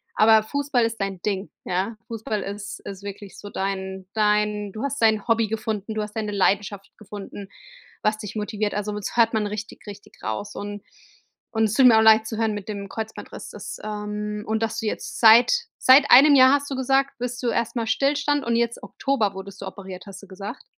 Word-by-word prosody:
aber 220 0 +6
Fußball 285 0 0
ist 230 0 -2
dein 195 -2 -3
Ding. 200 0 -2
Ja? 190 +5 -2
Fußball 220 -2 -3
ist 200 0 -7
ist 195 0 -9
wirklich 200 0 -9
so 205 - -9
dein 190 -1 -4
dein 210 -1 +1
du 220 - -6
hast 280 -1 -3
dein 220 -1 +3
Hobby 230 -1 +2
gefunden, 220 -1 -3
du 215 - -2
hast 210 0 -6
deine 210 -1 -2
Leidenschaft 200 0 0
gefunden, 205 -1 -9 0.5
was 215 0 +1
dich 210 -1 -8
motiviert. 210 0 -2
Also 210 +1 -2
das 210 +1 -5
hört 230 -1 +4
man 215 -1 0
richtig, 210 +1 -7
richtig 205 0 -12
raus 110 - -4
und 205 0 -6 0.7
und 220 -1 +1
es 210 - -1
tut 265 - +5
mir 220 -2 +6
leid 220 0 +6
zu 220 - -5
hören 225 -1 0
mit 205 -2 -6
dem 200 -2 -6
Kreuzbandriss, 220 +2 -7
dass - - -8
ähm 210 0 -4
und 220 0 -1
dass 225 - -1
du - - -5
jetzt 215 - -4
seit 230 +2 +7 0.2
seit 270 +2 +6
einem 285 +3 +9
Jahr, 260 -1 +7
hast 285 0 -3
du 275 - -3
gesagt, 270 +1 +1
bist 245 0 -4
du 250 - -2
erst 235 +1 -1
mal 230 -1 -1
Stillstand 285 +3 +1
und 235 0 +1
jetzt 235 0 -1
Oktober 225 -8 -1
wurdest 195 +1 -9
du 195 - -5
operiert, 190 -1 -9
hast 195 -1 -10
du 200 - -14
gesagt? 195 +2 -8
215 Hz, 205 wpm, -24 LUFS, 200-230 Hz, 0.7 s, einem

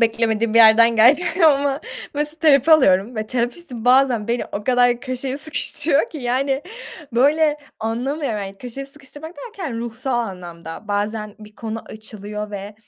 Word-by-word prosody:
beklemediğin 225 -1 +1
bir - - +6
yerden 230 +1 +7
gelecek 300 - +4
ama, 280 -2 +3 0.3
mesela, 300 +2 -2
terapi 300 -1 +4
alıyorum 225 -6 +4
ve 215 0 -3
terapistim 245 +1 -4
bazen, 250 -4 +3
beni 240 0 0
o 205 +1 -4
kadar 245 -1 +3
köşeye 255 +1 -4
sıkıştırıyor 300 -1 -1
ki, 310 - -7
yani. 265 +3 -1 0.5
Böyle, 295 +5 +3 0.2
anlamıyorum, 240 +2 -2
yani 195 -1 -6
köşeye 250 +4 -7
sıkıştırmak 290 +4 -10
derken, 355 - -6
ruhsal 240 +2 -3
anlamda, 175 -3 -7
bazen 210 +1 -2
bir 210 0 -14
konu 225 0 -6
açılıyor 210 -1 -8
ve 205 +1 -7
240 Hz, 145 wpm, -20 LUFS, 215-280 Hz, 0.5 s, yerden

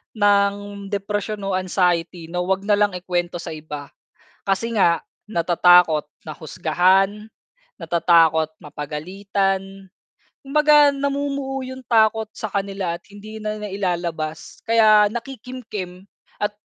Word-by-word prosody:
ng 200 -1 +1
depresyon 205 +1 -3
o 195 - -2
anxiety 175 -2 -1
na 180 - -2
'wag 190 +2 0
nalang 205 -2 +2
ikwento 175 -1 -2
sa 170 -1 -6
iba. 150 -2 -8 0.6
Kasi 195 +4 0
nga 170 -5 +3 0.2
natatakot 175 -4 +4 0.2
na - - -4
husgahan, 185 +6 +1 0.5
natatakot 165 -1 +3 0.2
mapagalitan. 195 +6 -3 0.6
Kumbaga 295 +1 +5
namumuo 275 -1 -2
yung 260 0 -8
takot 220 -1 +3
sa 220 - -4
kanila 195 -3 -2
at 170 - -34
hindi 215 +2 -10
na 215 0 -3
nailalabas, 175 -6 -4
kaya 215 -2 +6
nakikimkim 230 -7 -7 0.4
at 210 - 0
195 Hz, 110 wpm, -21 LUFS, 175-215 Hz, 0.6 s, kaya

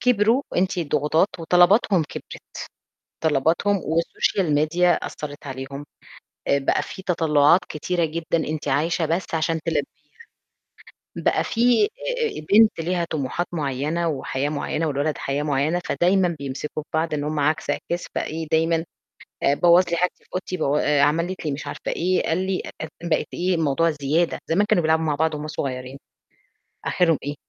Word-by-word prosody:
كبروا، 240 +1 +3
وأنتِ 185 +1 0
الضغوطات 155 +2 +2
وطلباتهم 180 +2 +4
كبرت، - - -10 0.6
طلباتهم 160 +7 +2
والسوشيال 165 +1 0
ميديا 170 +4 +3
أثّرت 145 -2 -6
عليهم 135 +2 -6 0.6
آآ، 140 - +4
بقى 135 - +1
في 190 - -8
تَطلُّعات 160 -2 +4
كتيرة 170 +3 -1
جدًا 165 +1 -1
أنتِ 155 -1 -4
عايشة 160 +4 +1
بس 165 +1 -2
عشان 160 0 0
تلبّيها، 165 -1 +1 1.3
بقى - - +1
في 245 - +3
آآ 475 +1 -3
آآ، - - -13
بنت 215 -3 +6
ليها 175 +1 0
طموحات 155 +3 -2
معيّنة 150 +2 -1
وحياة 140 -1 -2
معيّنة 155 +2 -2
والولد 145 +1 -1
حياة 140 +2 -2
معيّنة، 150 +4 0
فدايمًا 180 -1 +2
بيمسكم 140 +2 -5
ببعض 160 0 0
إن 145 -1 -2
هم 150 0 -1
عَكس 150 +2 0
عِكاس 175 +1 -3
فإيه 160 +1 -3
دايمًا 165 +1 +2 0.6
آآ، 140 - +4
بوّظ 175 +4 +5
لي 170 - +1
حاجتي 180 +1 -1
في - - -30
أوضتي 185 0 -3
بو 145 -3 +1
آآ، 145 -1 +2
عملت 170 +5 +1
لي 150 - 0
مش 140 +2 -5
عارفة - - -4
إيه، 185 +2 +1
قال 165 - +1
لي 190 -1 -1
أف - - -7
أف 160 - -4 0.2
بقت - - +1
إيه، 180 +1 0
الموضوع 165 +1 +2
زيادة، 160 +5 +1
زمان 200 +6 +2
كانوا 180 - +2
بيلعبوا 160 0 +2
مع 150 -2 +1
بعض 160 +1 +1
وهم 150 +1 -5
صغيّرين، 130 -3 -5 0.9
آخِرهم 165 -4 +2
إيه، 145 +1 -4
160 Hz, 160 wpm, -23 LUFS, 145-175 Hz, 1.3 s, بنت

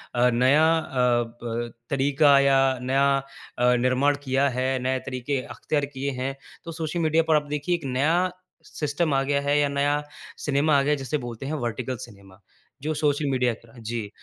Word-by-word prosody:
अ, 120 +1 +4
नया 130 +6 +4
अ, 125 -6 +1 0.2
ब 120 0 -3 0.2
तरीका 140 +1 +4
या 140 0 +4 0.2
नया 135 +2 +2 0.5
अ, 125 0 +4
निर्माण 130 +4 +2
किया 135 +1 +2
है, 130 0 -1 0.2
नए 130 0 0
तरीके 130 +1 -2
अख्तियार 145 +3 -2
किये 140 +1 -2
हैं, 135 +1 -2 0.3
तो 165 - -7
सोशल 160 +1 -3
मीडिया 160 0 +2
पर 160 - +4
आप 150 -1 +1
देखिए, 150 +4 -1
एक 165 -4 -7
नया 155 +8 +1 0.3
सिस्टम 150 +1 -2
आ 135 - +2
गया 140 +1 0
है 145 +1 +1
या 145 - +3
नया 145 +1 +1 0.4
सिनेमा 145 +1 +3
आ - - +4
गया 140 +2 +1
है, 150 - +2
जिसे 135 +2 -2
बोलते 120 -1 -7
हैं 145 - -3
वर्टिकल 125 +2 -4
सिनेमा। 100 -4 -17 0.4
जो 155 +3 -2
सोशल 150 0 0
मीडिया 125 -2 +1
की 115 - -13
तरह 115 +2 -16
जी, 115 -2 -4
140 Hz, 190 wpm, -25 LUFS, 125-145 Hz, 0.5 s, अ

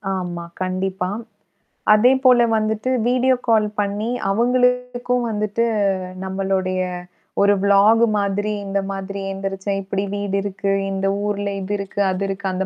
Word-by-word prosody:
ஆமா. 175 -2 -4 0.2
கண்டிப்பா. 185 0 -2 0.8
அதே 225 +4 +5
போல 250 -2 +6 0.2
வந்துட்டு 215 +2 -1 0.2
வீடியோ 255 +1 +3
கால் 220 -2 +4
பண்ணி 205 +2 -1 0.2
அவங்களுக்கும் 250 +2 +1
வந்துட்டு 215 +1 -1 0.6
நம்மளுடய 190 -1 -1 0.6
ஒரு 200 0 +5
விளாஃக் 200 +3 +5 0.2
மாதிரி 205 +1 -1
இந்த 195 0 0
மாதிரி 195 0 -5
எந்திரிச்சன். 195 0 -3
இப்டி 195 +1 -2
வீடு 200 -1 -2
இருக்கு, 195 0 -2 0.2
இந்த 195 0 -1 0.2
ஊர்ல 205 -1 -1
இது 190 +2 -3
இருக்கு, 200 0 -6
அது 185 +1 -2
இருக்கு 195 0 -5
அந்த 190 +1 -2
200 Hz, 130 wpm, -21 LUFS, 195-220 Hz, 0.8 s, போல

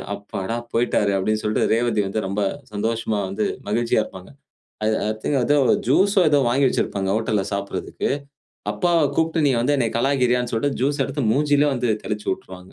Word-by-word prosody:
அப்பாடா, 100 +2 -5 0.2
போயிட்டாரு 115 -4 +2
அப்படின்னு 110 +3 0
சொல்லிட்டு, 105 0 +1
ரேவதி 115 -2 +1
வந்து 105 +3 -2
ரொம்ப 100 +2 -2 0.3
சந்தோஷமா 110 0 -1
வந்து 105 +2 -1 0.2
மகிழ்ச்சியா 115 +1 +1
இருப்பாங்க. 95 -1 -11 0.5
அது 110 - +2
ஐ - - 0
திங்க் 140 - +1
ஏதோ 145 +4 +3 0.3
ஜூஸ் 195 +10 +3
ஓ - - +6
ஏதோ 145 - +4
வாங்கி 135 +3 +3
வச்சிருப்பாங்க 95 -5 -1
ஹோட்டல்ல 110 -3 0
சப்படறதுக்கு. 100 0 -3 0.6
அப்பாவ 175 -3 +2
கூப்பிட்டு, 160 -1 +1
நீ 135 - +3
வந்து 135 +5 +2
என்ன 120 -4 +1
கலாய்க்கிறியான்னு 125 -2 +1
சொல்லிட்டு, 135 +5 -1
ஜூஸ் 140 0 +1
எடுத்து 135 -3 -2
மூஞ்சிலயே 145 0 +3
வந்து 120 -2 0
தெளிச்சு 105 -1 -4
உட்டுருவாங்க. 90 0 -13
115 Hz, 165 wpm, -22 LUFS, 105-140 Hz, 0.6 s, ஓ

